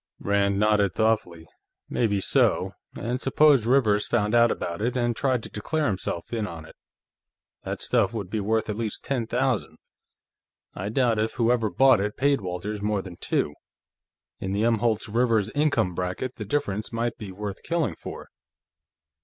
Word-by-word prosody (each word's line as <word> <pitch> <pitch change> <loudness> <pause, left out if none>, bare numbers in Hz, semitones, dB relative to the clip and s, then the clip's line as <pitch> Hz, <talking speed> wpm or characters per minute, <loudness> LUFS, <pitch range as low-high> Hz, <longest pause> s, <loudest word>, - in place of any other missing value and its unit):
Rand 100 0 +1
nodded 105 -3 +2
thoughtfully. 105 -7 0 0.4
"Maybe 105 -4 +1
so. - - +3 0.2
And 120 +4 -3
suppose 135 -3 +4
Rivers 110 -6 +3
found 105 -2 +1
out 120 0 +6
about 85 -1 -3
it, 120 +3 0
and 120 -1 +1
tried 130 -3 0
to - - -7
declare 155 +9 -2
himself 95 -1 -3
in 110 -2 -1
on 85 -3 -8
it. - - -15 0.9
That - - -4
stuff - - +2
would 110 -5 -4
be 110 +4 -2
worth 110 +2 0
at 105 - -2
least 110 -1 -4
ten 125 -5 -1
thousand; 125 -1 -1 1.0
I 95 +2 -4
doubt 115 -1 +2
if 110 +1 0
whoever 115 -2 +2
bought 135 0 +5
it 105 +1 -3
paid 140 -1 +2
Walters 95 +3 -4
more 105 -1 0
than 90 -3 -10
two. 75 - -1 0.9
In 95 0 -3
the 105 +2 0
Umholtz 115 -1 +1
Rivers 115 -2 +1
income 145 -11 +1
bracket, 90 +8 -3
the 105 - -5
difference 110 -4 -2
might 115 +1 -1
be 105 -3 -7
worth 100 +1 -6
killing 165 - -1
for." - - -9
110 Hz, 165 wpm, -25 LUFS, 100-120 Hz, 1.0 s, out